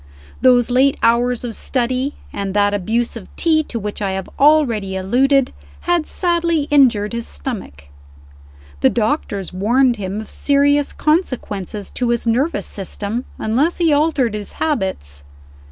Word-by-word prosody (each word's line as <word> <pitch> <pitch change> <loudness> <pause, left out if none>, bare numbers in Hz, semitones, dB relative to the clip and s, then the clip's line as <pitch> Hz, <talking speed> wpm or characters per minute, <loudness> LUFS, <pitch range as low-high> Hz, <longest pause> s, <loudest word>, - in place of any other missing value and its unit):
Those 245 -1 +4
late 265 +2 +3
hours 240 +1 +2
of 235 -3 -5
study, 255 +2 -1 0.2
and 195 -1 -4
that 205 0 +3
abuse 225 +5 -1
of 220 -5 -9
tea 320 -2 +3
to 235 - -5
which 210 -1 -5
I 195 -2 -1
have 190 -1 -4
already 255 -10 +3
alluded, 255 +8 +2 0.3
had 350 -3 0
sadly 340 -3 0
injured 235 -7 +3
his 235 0 -3
stomach. 195 - -5 1.0
The - - +4
doctors 215 - -2
warned 240 +6 +2
him 195 0 -4
of 220 - -7
serious 285 0 +2
consequences 215 - -2
to 245 -1 -2
his 235 0 0
nervous 255 +8 0
system, 205 +4 -4
unless 265 +10 0
he 330 -3 +2
altered 290 -6 +1
his 210 -1 -6
habits. 190 - -3
240 Hz, 140 wpm, -18 LUFS, 205-285 Hz, 1.0 s, Those